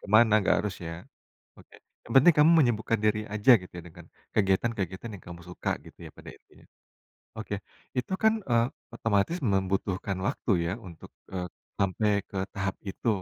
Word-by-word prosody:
ke - - -12
mana, 110 0 +7
enggak - - +3
harus 100 -3 -2
ya? 80 - -5 0.7
Oke, - - -17 0.3
yang 115 - -7
penting 165 +6 +7
kamu 150 +3 +7
menyembuhkan 115 -4 +1
diri 105 0 +2
aja 105 +5 +5
gitu 90 - -12
ya 85 - -7
dengan 80 - -14 0.3
kegiatan-kegiatan 95 0 0
yang 90 - -14
kamu 85 0 -9
suka 90 - -4 0.2
gitu - - -15
ya - - -8
intinya. - - -15 0.7
Oke, - - -4 0.4
itu 125 +9 -1
kan, 220 0 +6
eee, 120 -1 +2 0.3
otomatis 115 - +1
membutuhkan 95 - -1
waktu 130 -3 -2 0.2
ya 85 - -1 0.2
untuk, 85 -2 -12 0.2
eee, 90 -1 -3 0.3
sampai 100 +2 +1 0.2
ke 95 - -6 0.2
tahap 95 0 -2
itu, 100 +4 -6
105 Hz, 165 wpm, -28 LUFS, 95-115 Hz, 0.7 s, mana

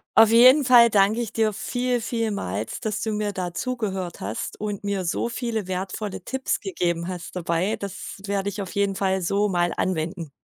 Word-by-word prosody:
Auf 225 -1 +8
jeden 255 +6 +7
Fall 245 -2 +7
danke 205 +1 +3
ich 230 -2 -3
dir 220 -1 +2
viel, 245 +4 -1
vielmals, 210 - -3
dass 210 -1 -3
du 220 - -1
mir 210 -1 -1
da 180 -2 -4
zugehört 195 -7 -3
hast 105 +3 -5
und 205 -2 -4
mir 200 -2 -1
so 180 +6 -1
viele 230 -5 -3
wertvolle 190 +2 -4
Tipps 265 0 -2
gegeben 170 -3 -1
hast 180 -1 -6
dabei. 180 +4 0
Das 200 -2 -7
werde 200 0 -1
ich 200 +1 -5
auf 185 -2 -6
jeden 200 -1 +1
Fall 190 -1 0
so 200 +4 +1
mal 175 -2 +1
anwenden. 165 -2 -2
200 Hz, 185 wpm, -24 LUFS, 180-225 Hz, -, Auf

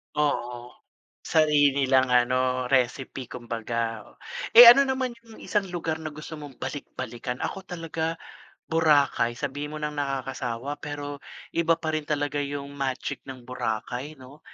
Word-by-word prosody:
Oo. 125 -5 -1 0.5
Sarili 150 -2 +4
nilang 130 -1 +3
ano 125 +1 +2
recipe 130 0 0
kumbaga. 115 -2 -3 0.5
Eh 235 +1 +12
ano 270 +4 +10
naman 260 -2 -1
yung 225 -1 -14
isang 210 -2 0
lugar 160 -2 -3
na 155 - -4
gusto 155 +2 -8
mong 145 -3 -10
balik-balikan? 125 -3 -5
Ako 195 - -4
talaga 165 -2 -4 0.5
Boracay, 145 -7 +3
sabihin 145 +3 -4
mo - - -4
nang 150 0 -3
nakakasawa 135 0 -3
pero 145 -1 -6 0.3
iba 165 0 +2
pa 160 -1 -3
rin 155 -1 -3
talaga 145 -1 -1
yung 140 0 -4
magic 135 0 -3
ng 130 -2 -9
Boracay, 125 +4 -4
'no? 130 +2 -14
145 Hz, 135 wpm, -26 LUFS, 125-155 Hz, 0.5 s, Eh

